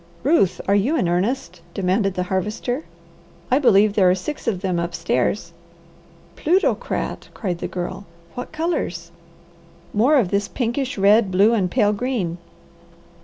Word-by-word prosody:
"Ruth, 265 - +3
are 200 - +3
you 210 +10 +2
in 180 - +1
earnest?" 180 +1 -1
demanded 195 +1 0
the 180 - 0
Harvester. 210 - -2 0.7
"I 260 - +4
believe 210 -6 +4
there 190 -3 +4
are 180 - +4
six 290 +11 -6
of 195 -6 0
them 185 -3 -1
upstairs." 170 - -1 0.8
"Plutocrat!" 365 +5 0
cried 180 -5 -3
the - - -3
Girl. 185 +2 -5 0.3
"What 245 - -6
colours?" 330 +2 -3 0.8
"More 245 +9 +4
of 235 -10 +3
this 200 +1 0
pinkish 255 +1 -2
red, 205 +2 +4
blue, 200 +5 +4
and 195 -5 +1
pale 210 -1 +2
green." 205 -7 -2
205 Hz, 140 wpm, -21 LUFS, 185-245 Hz, 0.8 s, I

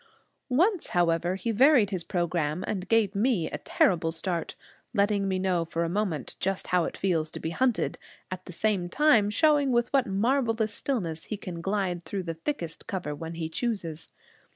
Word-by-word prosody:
Once, 350 - +2
however, 175 +1 +2
he 230 +4 -2
varied 245 -2 +5
his 185 -3 -2
program, 170 -3 -1
and 190 -2 -4
gave 225 -3 +3
me 210 -4 +1
a - - -4
terrible 165 -3 +2
start, 170 +1 -3 0.4
letting 200 -1 +2
me 190 -1 0
know 185 -2 +1
for 165 0 -2
a 165 - -1
moment 175 - -2
just 195 0 -1
how 180 -2 +4
it - - -5
feels 165 -5 0
to - - -6
be 160 - -3
hunted, 250 +5 0 0.3
at 185 0 -5
the - - -8
same 185 -1 0
time 250 -5 +4
showing 285 +4 +3
with 240 +1 +1
what 270 -2 +3
marvelous 225 +1 +1
stillness 175 - -2
he 215 - -4
can 175 -4 -7
glide 190 -2 -1
through 190 +4 -4
the 165 -1 -3
thickest 165 - -5
cover 180 -6 -3
when 165 +2 -6
he 165 -1 -3
chooses. 165 -5 -3
190 Hz, 180 wpm, -27 LUFS, 170-225 Hz, 0.4 s, varied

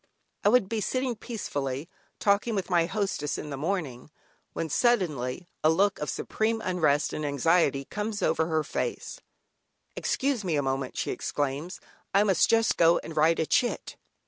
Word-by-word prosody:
I - - +5
would 245 -3 +4
be 220 +1 -2
sitting 255 +2 -1
peacefully 145 - -4 0.3
talking 210 +3 +2
with 195 -1 -3
my 170 -1 +3
hostess 190 -7 -2
in 150 - -6
the - - -3
morning, 150 -5 -3 0.4
when 165 - -2
suddenly, 170 - 0 0.2
a 155 - +5
look 195 +5 +2
of 150 - -3
supreme 225 +1 -1
unrest 165 -8 +1
and 155 - -3
anxiety 140 0 +2
comes 210 +3 -4
over 160 - +2
her 160 -2 +1
face: - - -4 0.7
"Excuse 265 -5 0
me, 175 -4 0
a 145 - +1
moment" 135 -1 -2
she - - -1
exclaims, 145 +4 -3 0.4
"I 200 - +6
must 195 -5 +3
just 225 0 +3
go 170 0 +5
and 160 - -8
write 160 +2 +4
a 160 - +2
chit." 245 +9 0
170 Hz, 165 wpm, -27 LUFS, 145-210 Hz, 0.7 s, I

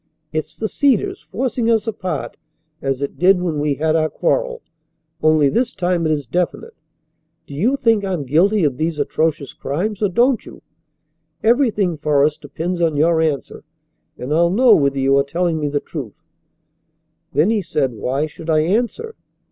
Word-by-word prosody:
It's 155 -1 -4
the 220 - -2
Cedars 370 - +1
forcing 245 -3 -2
us 225 -2 +2
apart 185 -5 -4 0.5
as 135 0 -2
it 140 - -5
did 185 +2 +5
when 170 -4 -2
we 145 -1 0
had 155 +2 0
our 155 -1 +2
quarrel. - - -1 0.6
Only 155 -2 +4
this 235 - 0
time 175 -2 0
it - - +1
is 145 -3 -1
definite. 175 +7 -2 0.7
Do - - -11
you 215 - +1
think 225 -5 +2
I'm 185 -6 -2
guilty 175 +9 +2
of 140 -4 +1
these 160 +1 -1
atrocious 150 -1 -1
crimes, 195 +9 -3
or 205 - +2
don't 240 +5 +2
you? - - -13 0.8
Everything 220 - +2
for 145 -1 +2
us 150 0 0
depends 170 +5 -4
on 160 -3 +1
your 160 +2 +3
answer, 155 -4 -2 0.5
and 130 +4 -4
I'll 170 +2 +3
know 230 +5 +5
whether 140 -4 +2
you 135 0 +3
are - - +3
telling 170 +3 -1
me 150 - -1
the 145 0 -1
truth." 140 - -8 1.1
"Then," 155 +10 +3
he 220 -2 +1
said, 140 -8 -1
"why 130 +6 -1
should 155 +1 -10
I 155 -1 +3
answer?" 240 - -1
165 Hz, 170 wpm, -19 LUFS, 150-215 Hz, 1.1 s, did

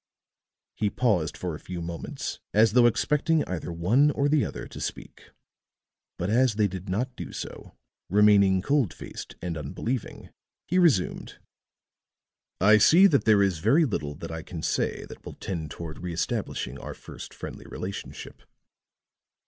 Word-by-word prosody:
He 105 - 0
paused 95 -11 0
for 90 -2 -3
a 75 - -7
few 90 -1 -6
moments 85 0 -5 0.2
as 110 0 +5
though 120 -1 +6
expecting 150 +6 +2
either 90 -1 -4
one 105 - +3
or 145 0 +1
the 145 -1 +3
other - - -5
to - - -9
speak; - - -7 0.9
but 90 - -2
as 120 +2 +3
they 105 -1 +3
did 95 0 -7
not 125 +7 -2
do - - -7
so, - - -8 0.3
remaining 100 -2 +5
cold 140 - +1
faced - - -9
and 85 -2 -3
unbelieving, 100 - -4 0.4
he 180 +3 +2
resumed: 145 - +1 1.2
"I 105 +3 +6
see 170 - +7
that 150 -8 +4
there 105 -2 +5
is 95 -5 0
very 155 - +4
little 75 - -3
that 85 - -7
I 80 0 -5
can 80 0 -8
say - - -1
that - - -12
will - - -8
tend 80 -5 -5
toward 80 +1 -7
reëstablishing 80 -6 -3
our - - -7
first - - -10
friendly - - -9
relationship. 95 +2 -7
100 Hz, 155 wpm, -27 LUFS, 85-125 Hz, 1.2 s, see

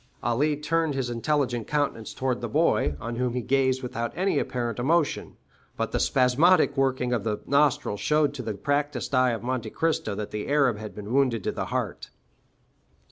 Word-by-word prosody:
Ali 145 +6 +1
turned 160 0 0
his 130 -3 -2
intelligent 120 -2 -1
countenance 145 -7 -1
towards 130 -2 -1
the 120 - -3
boy, 75 -8 +2
on 115 +1 -5
whom 125 -1 -1
he 125 - 0
gazed 130 0 +1
without 120 -2 -3
any 190 +2 +1
apparent 120 -3 -3
emotion; 155 +5 0 0.4
but - - -2
the - - 0
spasmodic 140 +5 +4
working 130 -2 +1
of 115 -4 -1
the 105 -1 -2
nostrils 140 -7 +2
showed 150 -1 +2
to 140 - -5
the 110 -4 -4
practiced 145 +7 -1
eye 130 -1 +4
of 115 -1 -3
Monte 125 -3 -2
Cristo 155 -8 -1
that 105 0 -5
the 105 -1 -4
Arab 140 -6 +2
had 110 -1 -8
been 105 +2 -6
wounded 130 -6 +2
to - - -1
the - - -3
heart. - - -3
130 Hz, 185 wpm, -26 LUFS, 115-145 Hz, 0.4 s, spasmodic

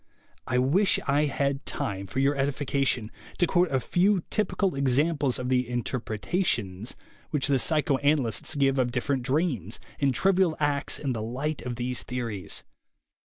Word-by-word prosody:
I 125 - +1
wish 155 +11 +3
I 145 +1 +3
had 140 0 -1
time, 100 -1 -3
for 95 - -8
your, 135 +2 +3
edification, 135 -4 0 0.3
to 175 - +4
quote 175 0 +2
a 135 - +1
few 180 - +2
typical 205 -3 0
examples 140 +1 +2
of 125 0 -3
the 125 -2 +1
"interpretations" 115 - -2 0.3
which 145 -3 0
the 135 -2 +2
psychoanalysts 145 -3 +1
give 135 -1 +2
of 125 -1 +1
different 130 +2 -1
dreams 130 - -1 0.2
and 140 -2 +3
trivial 185 +3 +2
acts 145 -1 +1
in 135 -3 -2
the 110 - -3
light 135 +7 -3
of 125 -1 -4
these 125 +1 -2
theories. 115 -6 -4
135 Hz, 150 wpm, -27 LUFS, 125-150 Hz, 0.3 s, to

